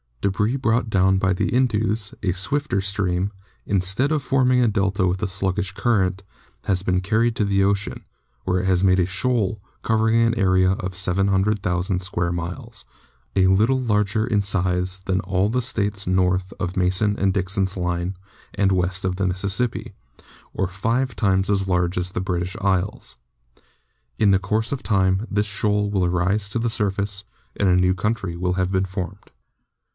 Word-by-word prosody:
Debris 105 +5 0
brought 120 -3 0
down 95 -1 +3
by 95 0 +1
the 90 - -1
Indus, 110 -4 0
a 95 - 0
swifter 100 - -1
stream, 95 -1 -1 0.4
instead 100 - +1
of 155 -2 +1
forming 130 -1 +2
a - - +3
delta 100 -2 +1
with 90 +1 -1
a - - +1
sluggish 95 0 -1
current, 100 -2 0 0.4
has 95 -1 0
been 90 -1 +1
carried 110 +4 +1
to 105 - +1
the 100 -1 +2
ocean, 100 0 -1 0.4
where 90 0 0
it - - -4
has 95 -1 +2
made 95 -1 +4
a 90 - +3
shoal 105 +1 -1 0.2
covering 110 +1 +2
an 115 0 +2
area 95 -3 +3
of 95 -1 -5
700,000 95 0 0
square 85 -2 -1
miles, 85 0 -5 0.5
a 95 -1 +4
little 110 +8 +3
larger 105 -2 +1
in 105 -3 +1
size 95 -1 0
than 95 0 0
all 95 +2 0
the 125 +3 0
States 105 -4 -2
north 90 0 +1
of 90 -1 -3
Mason 95 +3 +2
and 95 -1 +1
Dixon's 95 0 -1
line 90 0 -2 0.4
and 100 -1 +2
west 95 0 0
of 90 -1 0
the 95 0 0
Mississippi, 100 +6 -1 0.6
or 95 - -1
five 115 +7 -1
times 95 -2 +1
as 95 -1 +1
large 90 -1 0
as 90 0 -2
the 90 - -3
British 90 -1 -2
Isles. 95 0 -1 1.0
In 105 - +3
the 95 -1 +4
course 110 +3 -1
of 140 - -3
time 95 +1 +1
this 105 0 0
shoal 105 0 0
will 95 -3 +1
rise 95 +4 0
to 115 - -2
the 115 0 0
surface, 100 -2 -1 0.3
and 100 - +1
a 90 - +4
new 90 0 +3
country 100 -2 -2
will 90 +1 -1
have 95 0 -1
been 95 0 +1
formed. 95 +1 -6
95 Hz, 170 wpm, -22 LUFS, 95-105 Hz, 1.0 s, made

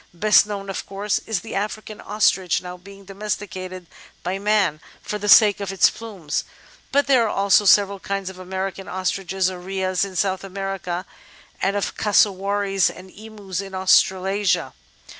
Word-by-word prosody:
Best 210 +3 +5
known, 200 -1 -5
of 195 - -4
course, 200 +1 -1
is 215 -5 -1
the 225 - -8
African 215 +1 -4
Ostrich, 190 -4 +1
now 180 0 -8
being 195 +2 -14
domesticated 190 -2 -5 0.4
by 185 +2 -2
man 200 -7 +1 0.2
for 210 - -4
the 205 0 -3
sake 210 -1 +7
of 200 -1 -4
its 195 - +4
plumes, 195 -10 -4 0.5
but 285 0 +3
there 260 -4 +4
are - - -1
also 200 +1 +3
several 200 0 +4
kinds 195 0 -4
of 190 -1 -7
American 190 +1 -5
Ostriches 190 0 -1
or 180 - -8
Rheas 185 0 -1
in 195 -2 -5
South 190 0 0
America, 195 -2 -4 0.6
and 195 +1 +1
of 200 - -2
Cassowaries 200 -1 +2
and 185 +1 -12
Emus 205 -3 -7
in 195 -1 -8
Australasia. 185 -4 +2
195 Hz, 160 wpm, -22 LUFS, 185-205 Hz, 0.6 s, sake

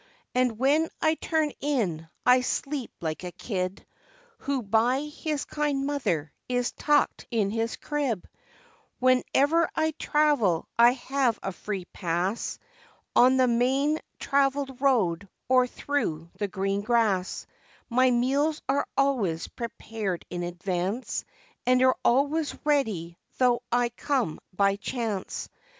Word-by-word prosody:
And 250 -3 +1
when 290 +6 +3
I 315 -1 +3
turn 315 -2 0
in, 195 - -1 0.2
I 250 +1 +6
sleep 275 +1 -2
like 160 +1 -3
a 180 - -5
kid, 185 -1 -4 0.5
Who 275 -3 -2
by 230 +6 +2
his 300 0 -3
kind 290 -2 -1
mother 175 - -1 0.2
is 245 -1 0
tucked 295 -1 +1
in 215 -5 +1
his 225 +1 -1
crib, 275 - -2 0.7
Wherever 275 +6 +3
I 315 0 +1
travel 290 - +2
I 235 +1 +7
have 260 -2 0
a 195 - -2
free 195 -1 -5
pass, 180 +4 -2 0.6
On 255 +2 +6
the 260 - +5
main 265 +6 +2 0.2
traveled 275 -1 0
road, 200 -9 +2 0.2
or 255 0 +4
through 170 - -2
the 205 +2 -2
green 195 0 -1
grass, 210 -5 +1 0.4
My 255 +2 +4
meals 275 +6 +1
are 275 +2 +1
always 230 -13 +1
prepared 225 -5 -4
in 175 - -3
advance, 180 +5 -3 0.4
And 255 0 +5
are 260 0 +5
always 285 +5 +2
ready 215 - 0 0.2
though 245 -2 +3
I 245 0 +2
come 240 - -1
by 200 +1 +2
chance. 215 -3 -3
245 Hz, 125 wpm, -27 LUFS, 195-275 Hz, 0.7 s, I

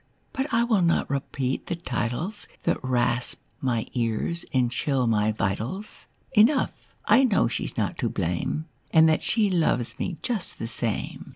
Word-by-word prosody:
But 270 +1 -2
I 230 - +3
will 225 -5 +2
not 170 -1 +2
repeat 135 -1 -2
the - - -1
titles 170 - -3 0.2
That - - 0
rasp 125 -1 0 0.2
my 120 -4 0
ears 120 +8 -1
and 125 -3 +2
chill 130 +1 +1
my 110 -2 +2
vitals. 110 - -3 0.3
Enough, 240 +5 +5 0.3
I 265 - +6
know 230 -6 +3
she's 115 - -3
not - - -1
to - - 0
blame. 90 - -2 0.2
And 160 0 +6
that 155 - +3
she 220 -2 +2
loves 160 -9 +1
me 175 - -2
just 220 -7 -2
the - - -4
same." 115 -1 -2
140 Hz, 160 wpm, -26 LUFS, 120-190 Hz, 0.3 s, I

